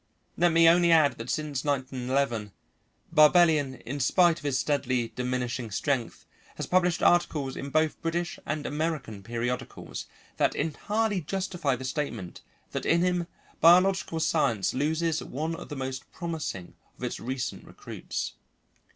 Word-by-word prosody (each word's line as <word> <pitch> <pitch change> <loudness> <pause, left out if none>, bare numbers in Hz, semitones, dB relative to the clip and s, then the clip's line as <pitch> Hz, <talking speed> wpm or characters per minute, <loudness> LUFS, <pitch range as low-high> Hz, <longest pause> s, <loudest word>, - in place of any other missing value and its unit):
Let 175 0 +3
me 165 0 +6
only 170 0 +5
add 155 -6 +4
that 115 +2 -6
since 150 -3 -2
1911 130 -5 -1 0.6
Barbellion, 155 -3 +5
in 145 +3 -5
spite 170 +5 +4
of - - -16
his 140 -3 0
steadily 130 -5 0
diminishing 125 0 -3
strength, 125 +3 -2 0.3
has - - -4
published 180 -2 +2
articles 150 -6 +2
in 140 - -5
both 155 +1 +1
British 170 +1 -2
and 150 -1 -3
American 145 -9 -3
periodicals, 120 +4 -4 0.3
that - - +2
entirely 205 +5 -1
justify 180 -4 -1
the 130 +1 -7
statement 130 - -4 0.3
that - - -3
in 170 - +4
him 180 -1 0 0.3
biological 175 0 +5
science 140 -11 +1
loses 160 +4 0
one 155 +5 -3
of - - -9
the 145 - -5
most 130 -1 -5
promising 160 - -5 0.2
of - - -11
its - - -3
recent 125 0 -4
recruits. - - -6
145 Hz, 140 wpm, -28 LUFS, 130-170 Hz, 0.6 s, me